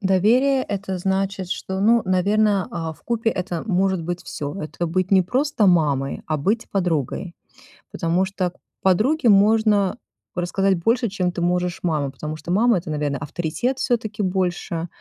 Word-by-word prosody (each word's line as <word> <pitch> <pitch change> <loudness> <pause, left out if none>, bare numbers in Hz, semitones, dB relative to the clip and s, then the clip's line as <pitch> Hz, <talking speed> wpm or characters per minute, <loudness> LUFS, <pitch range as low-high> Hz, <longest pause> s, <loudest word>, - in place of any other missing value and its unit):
Доверие- 230 +8 +3
это 195 -2 -3
значит, 190 0 -1
что, 190 0 -3
ну, 230 +2 +4
наверное, 200 +2 +2
а, 165 -2 -4
вкупе 230 +6 -1
это 180 -1 -3
может 190 -3 +1
быть 175 +2 -4
всё. 145 -1 -5
Это 170 +3 -4
быть 185 +2 -1
не 190 -2 +5
просто 250 - +1
мамой, 145 -6 +2
а 155 - 0
быть 205 +11 -1
подругой, 175 -1 -1 0.6
потому 175 +2 0
что 190 -1 -2
к - - -31 0.3
подруге 235 - +3
можно 210 0 +4 0.4
рассказать 190 +2 +1
больше, 230 -1 +2
чем 185 -2 -1
ты - - -4
можешь 180 +1 0
мама, 150 -5 0
потому 155 +3 -6
что 155 +3 -6
мама 225 +2 +4
это, 170 -1 -6
наверно, 145 -2 -1
авторитет 175 - -2
всё-таки 220 -4 -1
больше. 180 -2 -1
190 Hz, 155 wpm, -22 LUFS, 170-210 Hz, 0.6 s, не